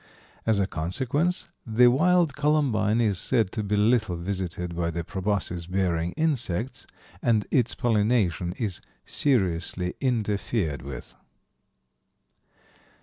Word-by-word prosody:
As 110 -2 +3
a 100 - +3
consequence, 130 - -1 0.2
the 120 +1 +4
wild 160 +4 +4
columbine 135 -8 +2
is 105 -6 +1
said 115 -7 +1
to 110 - -3
be 105 0 -1
little 105 -2 +2
visited 90 -1 -4
by 85 0 -1
the 85 0 -3
proboscis 95 -2 -2
bearing 90 -2 0
insects, 125 - -2 0.3
and 110 -4 +2
its 120 -4 +2
pollination 105 -7 +1
is 100 -4 -3 0.2
seriously 90 - 0
interfered 105 - -1
with. 70 +1 -8
105 Hz, 110 wpm, -26 LUFS, 90-125 Hz, 0.3 s, the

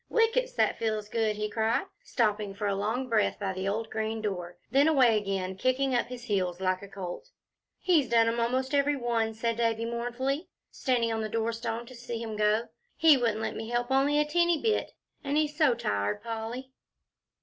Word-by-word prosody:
"Whickets! 470 +2 +2
that - - +1
feels 215 -2 -1
good!" 220 -1 0
he 210 0 -2
cried, 220 - 0 0.2
stopping 210 - 0
for 210 - -3
a 200 - +1
long 220 +6 -1
breath 225 -3 +1
by 195 -2 -2
the 190 +1 -3
old 220 +3 -2
green 220 0 -2
door; 180 -5 -4
then 275 +3 +5
away 260 -7 +5
again, 195 -2 -2
kicking 255 +6 +1
up 240 - +1
his 245 -1 -8
heels 185 -6 -1
like 185 -1 0
a 200 - -9
colt. 195 - -7 0.5
"He's 320 -8 +2
done 230 -1 +4
'em 230 +1 0
almost 255 +4 0
every 285 +1 +3
one," 230 -3 -1
said 230 0 -1
Davie, 230 -1 +1
mournfully, 245 +6 -2 0.2
standing 240 -4 0
on 220 - -1
the 215 - -3
doorstone 230 +1 -2
to 255 - -12
see 240 -1 -6
him 225 -2 -5
go; 215 +2 +1 0.3
"he 320 -2 +7
wouldn't 230 -4 0
let 220 - -3
me 225 0 -5
help 240 +1 -1
only 275 +2 +3
a 300 - +3
teenty 345 +1 +2
bit, 440 +4 0 0.3
and 285 +1 0
he's 300 -1 +1
so 295 -6 +4
tired, 100 - -1
Polly." 230 +3 -5
230 Hz, 195 wpm, -29 LUFS, 215-260 Hz, 0.5 s, he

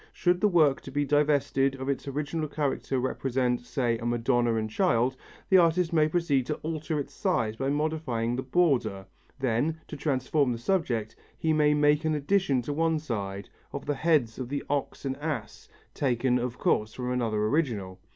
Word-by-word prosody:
Should 180 0 +1
the 210 - +5
work 155 -8 +3
to - - -9
be 145 +1 0
divested 140 -2 +2
of 135 0 -6
its 140 0 -2
original 150 +3 -2
character 140 -2 -2
represent, 125 -1 0
say, 120 -3 -1
a 115 - -6
Madonna 120 0 +1
and 110 -1 -1
Child, 130 - +1 0.3
the 190 - +7
artist 170 0 +2
may 155 -2 +4
proceed 155 -6 +1
to 150 - -1
alter 155 -1 -2
its 140 - -5
size 110 -1 0
by 135 +4 -2
modifying 145 -6 -1
the 130 - -2
border; 130 - +1 0.3
then, 135 +5 0
to - - -7
transform 140 -1 0
the - - -4
subject, 120 - -1 0.2
he 160 -1 +1
may 150 -1 +4
make 150 +1 +3
an 155 -1 +1
addition 145 -4 +1
on 145 - -2
one 165 0 +2
side, 100 -9 -4 0.2
of - - -6
the 145 - 0
heads 145 -7 +1
of 125 -2 -4
the 145 0 -3
ox 145 0 -2
and 135 0 -2
ass, 150 0 -5 0.2
taken 125 -2 +1
of 125 0 -3
course 110 0 0
from 125 -1 -3
another 110 -4 0
original. 110 - -1
140 Hz, 180 wpm, -28 LUFS, 120-155 Hz, 0.3 s, the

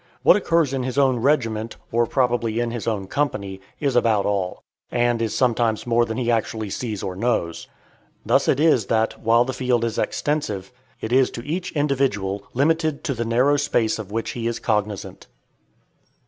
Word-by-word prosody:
What - - +7
occurs 165 -8 +1
in 135 - -1
his 130 +1 -4
own 135 -3 +3
regiment, 115 -4 0 0.2
or 120 0 +2
probably 120 -3 0
in 120 -1 -1
his 115 -1 -5
own 105 -4 -1
company, 100 -6 -2 0.2
is 140 -4 0
about 110 -4 +3
all, 95 -3 -2 0.3
and 120 -1 +1
is 115 -2 -1
sometimes 120 -3 +1
more 120 0 +3
than 110 +1 -4
he 120 -2 0
actually 110 -2 -1
sees 110 -3 -4
or 95 - -4
knows. 90 -6 -1 0.6
Thus - - +3
it 135 - +2
is 150 -9 +3
that, 110 0 0
while 115 +2 +4
the 130 - -3
field 125 -2 0
is 115 - -2
extensive, 115 -11 -2 0.3
it 110 - -3
is 130 0 +4
to 120 - -8
each 175 +4 -3
individual 130 -10 0
limited 155 +2 +1
to 140 - -1
the 115 -1 -3
narrow 125 +5 +3
space 120 -6 +1
of 105 -3 -7
which 115 +1 -2
he 115 -1 -3
is 120 - -2
cognizant. 105 -3 -2
120 Hz, 180 wpm, -22 LUFS, 110-135 Hz, 0.6 s, What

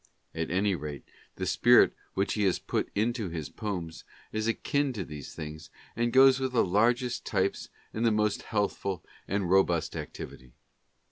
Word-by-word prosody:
At 80 0 -3
any 100 +3 +2
rate, 75 -4 -5 0.3
the - - -3
spirit - - +5 0.2
which 95 +1 +1
he 105 - -1
has 95 - +2
put - - -2
into 110 -1 0
his 80 -3 -5
poems 90 -7 -5 0.3
is 110 +1 -1
akin 140 +4 0
to 100 -6 -4
these 75 -2 -9
things, 75 -1 -7 0.3
and 120 +1 +1
goes 130 +1 +7
with 130 -1 -2
the 120 - +4
largest 120 +6 +2
types 100 -3 -1 0.2
and 110 - -2
the 115 - +5
most 105 -1 +1
healthful 100 -3 -2 0.2
and 100 -1 -1
robust 90 -3 +2
activity. 65 -1 -8
100 Hz, 160 wpm, -29 LUFS, 85-115 Hz, 0.3 s, goes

